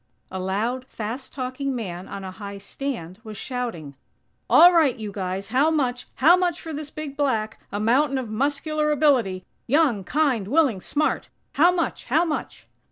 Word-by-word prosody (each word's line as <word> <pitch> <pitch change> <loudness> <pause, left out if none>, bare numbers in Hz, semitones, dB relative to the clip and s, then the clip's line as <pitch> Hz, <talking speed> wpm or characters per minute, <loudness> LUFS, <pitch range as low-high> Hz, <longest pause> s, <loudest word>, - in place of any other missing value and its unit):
A 190 - -4
loud, 225 +8 -2
fast 230 +4 -6
talking 260 +1 -3
man, 185 -6 -5
on 200 -1 -7
a 190 - -6
high 200 0 -8
stand, 200 -4 -6
was 215 -2 -8
shouting: 230 - -5 0.6
"All 355 +1 +8
right, 315 -7 +4
you 215 -2 -5
guys! 190 0 -4
How 270 +6 +3
much? 255 -6 -1
How 320 +7 +6
much 360 -2 0
for 320 - -7
this 295 0 -5
big 300 -2 -7
black? 230 -7 -1
A 205 - -2
mountain 265 +6 +2
of 255 -3 -3
muscular 290 +6 0
ability! 250 -11 +2 0.2
Young, 265 -7 +3
kind, 265 -6 +1
willing, 265 - +2
smart! 300 +9 -1 0.2
How 340 +5 +5
much? 350 -2 -2
How 315 +7 +2
much?" 310 -2 -4
255 Hz, 165 wpm, -24 LUFS, 205-300 Hz, 0.6 s, All